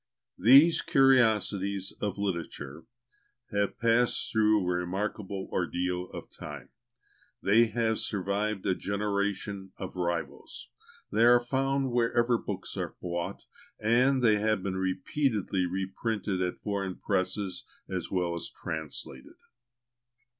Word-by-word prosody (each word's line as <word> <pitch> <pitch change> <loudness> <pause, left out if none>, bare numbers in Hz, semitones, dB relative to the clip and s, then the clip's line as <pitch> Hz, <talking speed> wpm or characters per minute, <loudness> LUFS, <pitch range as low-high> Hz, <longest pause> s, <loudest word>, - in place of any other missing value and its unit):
These 140 - +7
"Curiosities 105 -7 +3
of 100 -2 -2
Literature" 85 -6 -4 0.7
have 100 -1 0
passed 115 +1 +2
through 110 -1 +4
a - - -2
remarkable 95 +1 -3
ordeal 90 0 -1
of - - -9
time; - - -9 0.7
they 110 +4 +5
have 110 0 0
survived 100 0 -1
a 95 - +3
generation 100 -1 -2
of 95 - -6
rivals; 85 -2 -4 0.4
they 110 +2 +3
are 120 +1 +7
found 135 +2 0
wherever 120 0 +2
books 100 -2 -5
are - - -4
bought, 85 -1 -4 0.4
and 125 +4 +3
they 110 -3 +5
have 110 -2 +1
been 95 -1 -2
repeatedly 95 +1 0
reprinted 95 +1 -2
at 90 -1 -1
foreign 100 -3 -2
presses, 95 0 -2 0.2
as 90 -3 -4
well 90 -2 0
as 85 - -4
translated. 75 -4 -7
100 Hz, 115 wpm, -29 LUFS, 95-115 Hz, 0.7 s, These